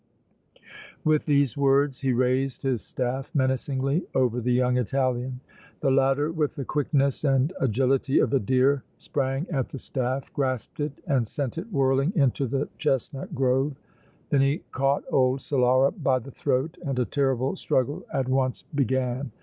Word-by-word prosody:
With 155 -1 +2
these 140 -5 +2
words 140 -1 +2
he 135 -1 0
raised 130 +2 0
his 130 -4 0
staff 130 +1 -3
menacingly 135 +3 0
over 125 -2 +2
the 125 +2 0
young 125 0 +2
Italian. 125 0 -1 0.4
The 135 - +2
latter 135 +3 +2
with 155 -3 -1
the 140 -4 -4
quickness 140 -1 0
and 135 +3 +2
agility 135 - +1
of - - +2
a 135 - +4
deer 130 +4 +2
sprang 135 +2 -2
at 135 -6 -1
the - - -7
staff, 130 0 -3
grasped 130 -3 -2
it 145 -1 -2
and 135 - +1
sent 140 +5 -3
it 210 +7 -8
whirling 135 +2 +2
into 140 -3 +2
the 135 +4 -1
chestnut 135 -1 -2
grove. 135 +2 +1 0.6
Then 140 - +4
he 140 +3 +1
caught 135 +1 +1
old 130 0 +2
Solara 130 0 +3
by 130 -2 +3
the 130 +2 -8
throat 130 +5 -1
and 135 -2 -2
a 125 - +2
terrible 135 -1 0
struggle 130 +3 -1
at 135 -2 -1
once 130 -1 0
began. 130 -1 0
135 Hz, 160 wpm, -26 LUFS, 130-140 Hz, 0.6 s, a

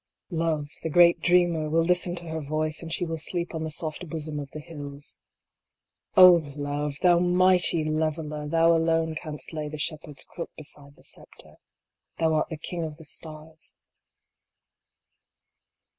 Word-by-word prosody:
Love, 160 -3 0 0.2
the 160 - -3
great 170 +2 +6
Dreamer, 175 -3 +2
will 165 +2 +3
listen 180 +1 +2
to 170 -1 -5
her 160 0 -3
voice, 155 +1 -1
and 165 -1 -7
she 175 - 0
will 165 -1 -4
sleep 170 +2 -2
on 160 -1 -3
the 160 - -3
soft 155 +2 -5
bosom 155 -2 -4
of 140 -1 -6
the 155 - -8
hills. 145 -2 -9 1.0
O 180 -2 +9
Love! 145 0 -3
thou 175 -1 +6
Mighty 180 -2 +4
Leveler, 155 -1 -2
Thou 165 +2 +4
alone 165 -1 +2
canst 155 -2 -4
lay 155 -1 -3
the 155 - -6
shepherd 150 -1 -3
s - - -6
crook 170 - -7
beside 145 -2 -7
the - - -20
sceptre, - - -9 0.6
Thou 160 -1 +2
art 155 - +1
the 160 - -5
King 170 +2 -4
of 155 -2 -6
the 160 - -13
Stars. 155 +1 -7
160 Hz, 160 wpm, -26 LUFS, 150-170 Hz, 1.0 s, O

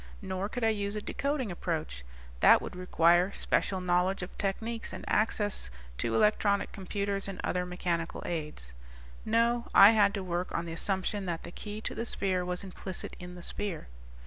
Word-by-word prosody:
Nor 190 +1 -2
could 245 +1 -4
I 225 - +5
use 205 -1 -1
a 210 - -2
decoding 280 -6 -1
approach 160 - -3 0.4
that - - +7
would - - -7
require 175 0 +3
special 190 -2 +1
knowledge 180 +1 +1
of 180 - -8
techniques 225 +4 -2
and - - -7
access 210 - +1 0.3
to 115 -1 0
electronic 205 - +3
computers 200 0 -2
and 195 -2 -6
other 180 0 -1
mechanical 175 -2 -2
aids. 150 - -5 0.5
No, 235 +2 +2
I 200 +2 +10
had 205 -2 +4
to 195 - -3
work 180 0 -2
on 170 - -2
the 165 - -5
assumption 190 +3 -1
that 170 -2 -3
the - - -8
key 210 +3 -6
to - - -3
the 230 - -3
sphere 185 -5 +1
was 180 +1 -3
implicit 190 -1 -6
in 180 0 -8
the 175 - -10
sphere." 190 - -4
190 Hz, 175 wpm, -30 LUFS, 175-205 Hz, 0.5 s, I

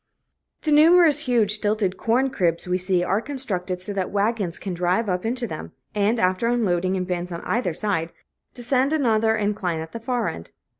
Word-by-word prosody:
The 310 - 0
numerous 315 0 +6
huge 240 -8 +1
stilted 210 -2 0
corn 250 +7 +1
cribs 170 -9 0
we 180 +1 0
see 185 -1 0
are 195 +4 0
constructed 190 -10 -3
so 205 +2 -4
that 190 -2 -2
wagons 200 -3 -1
can 190 - -5
drive 180 +5 0
up 180 +3 -1
into 245 +1 -1
them, 155 -8 -7 0.2
and, 210 +3 +1
after 185 +4 +1
unloading 190 -6 +1
in 185 - -1
bins 180 0 -3
on 170 - -5
either 205 -9 -1
side, 170 -5 -1 0.4
descend 260 +3 +1
another 225 -6 +2
incline 205 -5 -1
at 160 0 -7
the 230 - -6
far 240 0 -1
end. 85 0 -6
205 Hz, 185 wpm, -23 LUFS, 180-240 Hz, 0.4 s, numerous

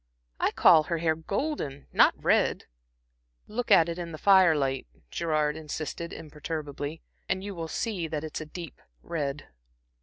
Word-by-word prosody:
I - - +3
call 155 -1 +6
her 170 - -1
hair 160 -1 +1
golden, 160 - -3
not - - +6
red." - - +2 0.8
"Look 240 +3 -4
at 180 -5 +7
it 170 +1 -4
in 170 -1 -5
the - - -5
fire 190 -3 +6
light," 135 - -1 0.2
Gerard 155 -2 0
insisted 160 +2 -5
imperturbably, 150 0 -6 0.3
"and 190 0 0
you 200 0 -5
will 165 -3 -5
see 185 -1 -2
that 155 -1 -4
it's 155 0 -5
a 155 - -7
deep 170 +1 -9 0.2
red." 145 -3 -3
160 Hz, 155 wpm, -28 LUFS, 150-175 Hz, 0.8 s, at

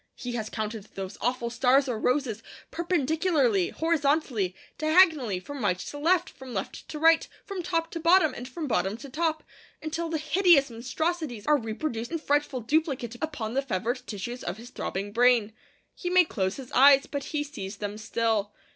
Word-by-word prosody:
He 245 - -5
has 220 -3 -3
counted 215 -2 -4
those 190 -1 -5
awful 240 0 -1
stars 265 +3 +3
or 235 -4 -2
roses, 250 -4 0 0.3
perpendicularly, 315 - +1
horizontally, 285 - 0 0.2
diagonally, 310 - +4
from 275 +6 -7
right 180 -3 +2
to 290 - -7
left, 350 +4 +3
from 260 -3 -10
left 195 - -5
to 305 - -5
right, 325 +1 +4 0.2
from 390 -3 -4
top 330 -1 -1
to 335 - -4
bottom, 335 0 +4
and 245 +2 -7
from 320 +4 -5
bottom 215 -5 0
to 275 +3 -10
top, 315 +2 -1 0.4
until 325 +2 -3
the 320 - -1
hideous 310 -3 +4
monstrosities 255 +1 -3
are 300 0 +4
reproduced 230 0 -4
in 335 - 0
frightful 290 -4 0
duplicate 265 -2 0
upon 250 -9 -3
the 270 - +1
fevered 240 0 -2
tissues 240 +4 -5
of 175 +3 -4
his 240 +3 -11
throbbing 195 +2 -4
brain. 235 -2 +4 0.4
He 355 - -4
may 360 0 +5
close 190 - -2
his 260 -3 -9
eyes, 275 +1 +7
but 280 -2 -5
he 300 -1 -2
sees 205 -9 -7
them 205 +1 -5
still. 220 -2 0
265 Hz, 175 wpm, -27 LUFS, 225-315 Hz, 0.4 s, eyes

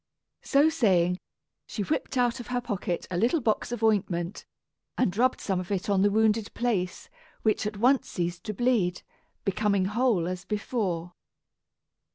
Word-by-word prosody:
So 285 +2 +4
saying, 185 - +2 0.5
she 210 - -3
whipped 295 +1 -2
out 245 0 +2
of 240 - -8
her 245 0 -1
pocket 200 -7 -3
a 175 - -1
little 240 - +2
box 230 -2 0
of 240 -2 -4
ointment, 195 -4 0 0.5
and 205 -8 +1
rubbed 255 +4 +2
some 190 -3 -1
of 180 - -6
it 195 +1 -1
on 195 -1 +3
the 205 - +5
wounded 220 0 +2
place, 205 -7 -1 0.4
which 215 -1 +1
at 210 -1 -5
once 255 +5 +3
ceased 175 0 -3
to 215 - -3
bleed, 210 -7 +1 0.4
becoming 200 0 +1
whole 210 -4 +1
as 180 0 -4
before. 195 -5 -2
210 Hz, 160 wpm, -27 LUFS, 185-240 Hz, 0.5 s, the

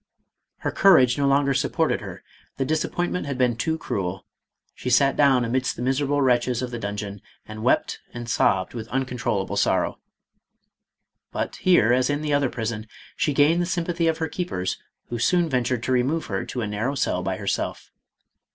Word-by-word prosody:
Her - - -1
courage 130 - +5
no 140 - +2
longer 140 0 +3
supported - - 0
her; - - -9 0.3
the 135 - 0
disap 155 +3 -1
pointment 175 -2 -2
had 140 -2 -3
been 125 -2 +2
too 160 +7 -1
cruel; 95 - -4 0.5
she 125 - -5
sat 135 +2 +4
down 135 -4 +4
amidst 130 +3 -1
the 120 - -5
miserable 140 +2 +1
wretches 125 -1 +2
of 125 - -4
the 120 - -4
dungeon 100 -1 -5 0.3
and 110 0 -8
wept 125 - +1
and 120 0 -7
sobbed 95 -5 +1
with 115 -2 -6
uncontrollable 125 -2 -2
sorrow. - - +1 1.3
But - - -3
here, 125 - +4
as 130 +1 +2
in 145 +1 -1
the 150 -1 0
other 140 -2 +2
prison, 110 -2 -4 0.3
she 150 - +1
gained 150 +5 +4
the 175 - -1
sympathy 170 -1 -1
of 160 -1 +1
her 160 - -1
keepers, 165 - -3 0.3
who 120 - -3
soon 175 +7 +2
ventured 125 -4 0
to 130 - -1
remove 130 +6 +1
her 95 -2 -3
to 125 - -4
a 110 - -2
narrow 110 +7 -2
cell 90 -8 0
by 95 0 -2
herself. 100 0 -3
130 Hz, 180 wpm, -24 LUFS, 115-145 Hz, 1.3 s, courage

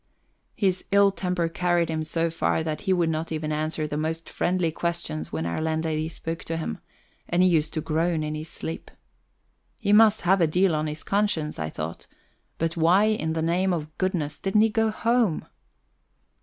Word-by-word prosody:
His 190 -3 0
ill 200 0 +5
temper 180 -3 -1
carried 175 0 +1
him 160 -1 -2
so 165 +1 -1
far 160 0 0
that 155 -1 -3
he 195 - -1
would 175 -3 +2
not 160 +1 -3
even 155 -1 -2
answer 155 +1 -1
the 150 -1 -3
most 160 +1 -3
friendly 180 -2 0
questions 155 - -3
when 80 0 -2
our 85 - -2
landlady 160 0 -1
spoke 165 0 -5
to 165 - -3
him; 160 - -4 0.5
and 175 +1 +3
he - - +6
used 155 -3 +2
to 155 - 0
groan 160 +1 0
in 150 0 -3
his 155 +1 -5
sleep. 160 - -6 0.9
He 205 - +1
must 220 0 +6
have 190 +1 +3
a 165 - +5
deal 180 +3 +2
on 155 0 0
his 150 +1 -5
conscience, 195 - 0
I 80 0 -2
thought 80 +2 -6 0.5
but 165 0 -1
why 180 +6 +4
in 160 -7 0
the 160 0 -1
name 180 +3 +1
of 155 -2 -4
goodness 175 -6 -1
didn't 195 +2 +2
he 225 - +4
go 225 0 +2
home? 230 -5 +1
165 Hz, 190 wpm, -25 LUFS, 155-185 Hz, 0.9 s, he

